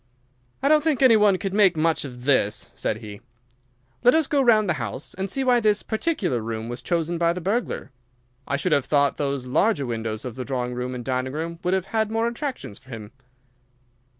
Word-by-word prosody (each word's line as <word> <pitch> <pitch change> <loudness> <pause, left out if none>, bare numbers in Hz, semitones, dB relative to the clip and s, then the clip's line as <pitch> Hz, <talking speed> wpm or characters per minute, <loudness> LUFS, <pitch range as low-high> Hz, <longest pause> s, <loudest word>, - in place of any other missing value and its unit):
"I - - +3
don't 305 0 +5
think 300 -4 +1
any 250 -3 +7
one 210 -3 +4
could 195 0 -4
make 195 -5 +4
much 160 -1 +1
of 125 -2 -9
this," 115 -7 +1
said 110 - -3
he. 105 -2 -9 0.8
"Let 245 - +6
us 320 -1 +3
go 285 0 +1
round 220 -5 +4
the 175 - +2
house 115 +5 -5
and 190 +1 -4
see 270 +7 -1
why 250 -2 +4
this 210 -2 +2
particular 220 - -1
room 110 0 -4
was 120 0 -5
chosen 170 +4 -1
by 170 0 +3
the 180 - -5
burglar. 200 - -2 0.6
I 140 - 0
should 165 +5 -1
have 140 -3 +3
thought 145 -1 +2
those 140 -3 -2
larger 145 - +1
windows 110 -2 -4
of 125 - -5
the 130 - -4
drawing 125 -2 -3
room 125 +1 -4
and 120 -1 -6
dining 130 0 -2
room 165 +2 -4
would 180 +1 +2
have 190 -1 -1
had 220 +1 0
more 225 +1 0
attractions 240 - -5
for 130 - -22
him." 110 -3 -8
165 Hz, 210 wpm, -24 LUFS, -, 0.8 s, any